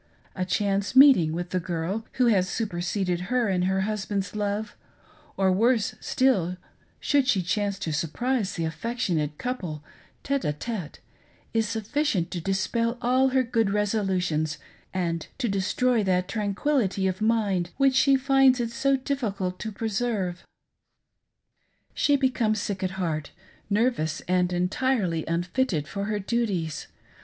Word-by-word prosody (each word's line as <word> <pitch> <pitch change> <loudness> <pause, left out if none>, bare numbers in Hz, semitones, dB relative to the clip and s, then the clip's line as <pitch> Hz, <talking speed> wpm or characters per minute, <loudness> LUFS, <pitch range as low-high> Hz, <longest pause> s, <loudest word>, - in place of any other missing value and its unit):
A 185 - -1
chance 200 +3 0
meeting 260 - +7
with 175 +2 -4
the 185 - +1
girl 180 +5 -3
who 255 - +2
has 195 -5 +3
superseded 180 -3 -1
her 250 -2 +2
in 185 -2 +1
her 190 +1 +1
husband's 200 -1 -2
love; 210 +1 -2 0.6
or 190 -1 +3
worse 225 +2 +2
still, 190 -10 +1 0.4
should 280 -3 +2
she 195 -9 +2
chance 200 +2 -1
to 160 -5 -3
surprise 205 - -1
the 165 - -1
affectionate 160 -4 -2
couple 180 - -4 0.4
tHe 280 0 0
d 150 - -1
tite, 180 0 -6 0.5
is 225 -2 +1
sufficient 225 - -1
to 175 - -3
dispel 230 +6 0
all 255 +2 +3
her 260 0 +2
good 230 -3 +1
resolutions 190 -7 0 0.3
and 170 -3 -2
to 250 - -1
destroy 215 +4 +1
that 180 -1 +1
tranquility 205 -1 0
of 185 +2 -1
mind 205 -6 +1
which 270 -1 +4
she 275 +1 +5
finds 270 -1 +4
it 235 -1 -1
so 270 +3 +2
difficult 205 -9 -3
to 220 - -4
preserve. 210 -4 -2 1.5
She 290 - +3
becomes 250 -5 +1
sick 200 -2 -3
at 185 -1 -1
heart, 155 -5 -2 0.4
nervous 205 -8 +1
and 180 0 +1
entirely 180 -1 0
unfitted 175 - -1
for 200 0 -4
her 210 0 -1
duties. 195 -7 -2
200 Hz, 140 wpm, -26 LUFS, 180-240 Hz, 1.5 s, meeting